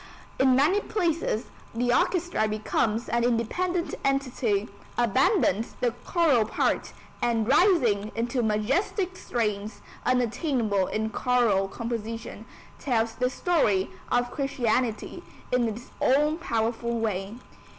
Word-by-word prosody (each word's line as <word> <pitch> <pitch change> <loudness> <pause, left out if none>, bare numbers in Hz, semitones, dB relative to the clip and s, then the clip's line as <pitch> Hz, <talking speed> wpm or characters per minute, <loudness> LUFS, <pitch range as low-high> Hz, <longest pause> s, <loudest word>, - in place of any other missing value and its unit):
In 260 -1 +5
many 300 +10 +4
places 335 - -1 0.3
the 245 +1 +1
orchestra 350 -8 +1
becomes 215 +1 -1
an 235 0 0
independent 335 +10 0
entity, 255 -6 0 0.3
abandons 240 - +2
the 245 - +1
choral 310 -10 +3
part, 215 - -1 0.3
and, 230 -2 +1
rising 245 - +3
into 240 +2 -1
majestic 270 - 0
strains 210 - -3 0.2
unattainable 240 - +1
in 220 0 -2
choral 225 -4 +2
composition, 230 +1 -5 0.3
tells 230 -4 0
the 250 0 0
story 250 - +1 0.2
of 245 0 +1
Christianity 250 -4 -1 0.3
in 250 -2 +2
its 225 +2 -7
own 300 +4 +3
powerful 235 -4 -1
way. 205 -1 -2
240 Hz, 110 wpm, -26 LUFS, 220-275 Hz, 0.3 s, In